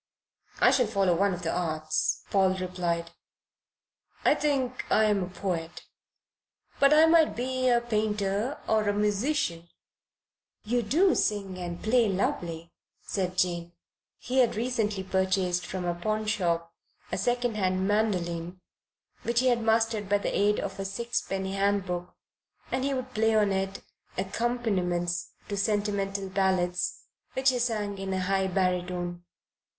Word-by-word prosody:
"I - - +6
shall 250 -4 +3
follow 195 -4 +2
one 200 +3 +2
of 180 -1 -5
the 165 - 0
arts," 155 -3 -1
Paul 190 -1 +3
replied. 175 -2 -2 1.1
"I - - +6
think 265 -4 -1
I 220 - +5
am 210 -2 +2
a 180 - -5
poet, 175 -3 -4 1.0
but 275 0 +6
I 310 +1 +7
might 325 -1 +4
be 255 +1 0
a 240 -1 +5
painter 215 +1 -1
or 215 -1 +2
a - - +2
musician." 210 - 0 0.9
"You 240 +3 +1
do 330 - +3
sing 195 -3 -1
and 175 -1 -5
play 230 0 +3
lovely," 170 -3 -2 0.3
said 185 -2 -2
Jane. 175 -1 0 0.4
He 255 +2 -1
had 245 -3 +3
recently 220 -4 -1
purchased 190 -1 0
from 185 -1 -4
a 175 - 0
pawnshop 175 -4 -1 0.4
a 185 - -1
second 245 +2 0
hand 185 -1 +1
mandoline, 180 -5 -1 0.6
which 235 +1 +1
he 260 - +3
had 240 -1 +2
mastered 225 -2 +1
by 205 - +4
the 200 - -2
aid 210 +1 +3
of 195 0 -5
a - - -1
sixpenny 195 -3 -2
handbook, 195 -3 -1 0.6
and 260 0 0
he 275 0 0
would 255 0 -5
play 220 0 +2
on 210 -2 +3
it 195 0 -2 0.3
accompaniments 185 -5 -1
to 205 - -3
sentimental 200 -1 -1
ballads 185 -2 0 0.3
which 265 0 +3
he 250 - -1
sang 210 -4 -1
in 195 0 -4
a 190 - -1
high 190 +1 +1
baritone. 180 -1 -1
195 Hz, 145 wpm, -28 LUFS, 180-225 Hz, 1.1 s, I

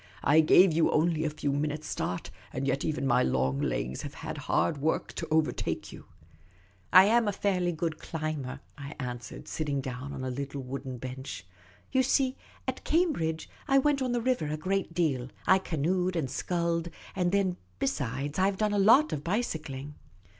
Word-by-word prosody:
" - - -21
I 160 - +8
gave 170 +3 +6
you 165 +1 +3
only 160 0 +2
a - - +1
few 145 -2 -2
minutes' 150 +2 -2
start, 90 - -3 0.2
and 135 - -3
yet 135 +1 0
even 155 -3 -1
my 125 -1 +4
long 65 +1 +1
legs 65 +2 -2
have - - -7
had - - -6
hard 115 - +2
work 155 +3 0
to 165 - -4
overtake 155 0 0
you. - - -11 0.2
' 80 -1 -28
' 90 0 -30
" 90 -1 -34
I 185 +1 +9
am 230 +1 +4
a - - +3
fairly 185 -3 0
good 165 -1 -3
climber," 150 -4 -4 0.2
I 140 +1 -7
answered, 125 -2 -6
sitting 145 -3 -2
down 130 +1 -5
on 130 - -5
a 130 - -2
little 140 +1 -4
wooden 130 0 -5
bench. 130 -4 -7 0.2
" 100 - -29
You 260 - +5
see, 260 0 +2 0.3
at - - -3
Cambridge, 250 - +1 0.2
I 275 -2 +4
went 275 0 +3
on 255 -1 0
the 240 -1 0
river 250 -10 +1
a 150 +1 -2
great 185 +1 -1
deal 135 -8 0
— - - -27
I - - +2
canoed 180 +2 0
and 140 -6 -1
sculled; 170 -1 -1 0.3
and 180 -2 +1
then, 190 -2 +1 0.2
besides, 135 - -2
I 190 +1 +4
've 195 - -4
done 210 0 +1
a 205 - +2
lot 245 +10 +6
of 145 - -3
bicycling." 155 - -3
155 Hz, 200 wpm, -29 LUFS, 135-185 Hz, 0.3 s, I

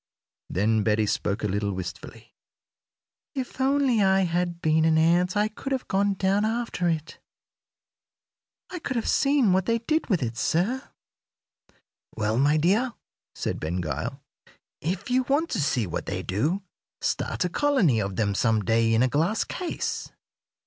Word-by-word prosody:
Then 110 +3 +1
Betty 105 0 +2
spoke 100 +1 -1
a - - +2
little 100 0 -1
wistfully: 90 -1 -8 1.0
"If 260 0 -4
only 270 -4 +3
I 190 0 +4
had 175 -1 -1
been 160 -1 +2
an 160 0 +4
ant 175 +4 +3
I 210 +1 +3
could 220 +5 -7
have 265 -2 -2
gone 200 +1 +1
down 195 +2 +1
after 220 -5 -1
it. 160 -1 -3 1.5
I 360 - -5
could 260 - -4
have 230 - -1
seen 275 -8 +3
what 190 0 +1
they 230 0 +3
did 310 +7 -1
with 180 - +2
it, 115 -1 -4
sir." 205 - 0 1.3
"Well, 110 +2 0
my 145 +3 +4
dear," 210 +11 +2 0.4
said - - -3
Ben 85 +4 -2
Gile, 80 - -3 0.6
"if 185 +8 -3
you 255 +1 +4
want 295 +5 +1
to 195 - 0
see 125 -5 +1
what 85 - -4
they - - -3
do, 150 - -1 0.4
start - - -1
a - - 0
colony 200 - +2
of 100 -2 -3
them 100 0 0
some 110 0 +1
day 115 0 +3
in 115 - +4
a - - +4
glass 160 - +1
case. 360 -2 -4
175 Hz, 160 wpm, -26 LUFS, -, 1.5 s, I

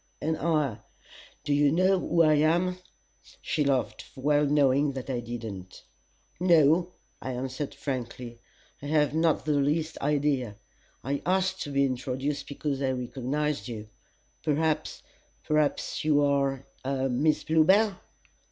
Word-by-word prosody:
And 160 +1 -1
I 150 -9 0 0.6
do 145 - 0
you 145 0 +4
know 185 +3 +3
who 170 -1 +2
I 155 -1 +5
am?" 170 +5 +2 0.6
She 150 - -1
laughed, 135 -3 -1
well 145 +2 +2
knowing 140 0 +3
that 130 0 -5
I 125 - -1
did 120 0 -6
not. 95 -4 -8 0.6
"No," 170 0 +4 0.3
I 130 - -4
answered 130 +3 -4
frankly. 120 -3 -5 0.4
"I 145 - -6
have 150 -1 +2
not 160 -1 +1
the 155 - 0
least 155 +3 0
idea. 140 -6 0 0.5
I 140 +1 -2
asked 190 +1 0
to - - -6
be 140 0 +3
introduced 130 +2 -3
because 140 -1 -3
I 135 - +1
recognized 135 +4 -2
you. 110 -3 -7 0.5
Perhaps 155 +1 -1 0.4
perhaps 155 -1 0
you 145 -1 +3
are 140 -1 +1 0.2
a 135 0 -1
Miss 140 +5 +1
Bluebell?" 190 +7 +4
145 Hz, 135 wpm, -27 LUFS, 130-155 Hz, 0.6 s, I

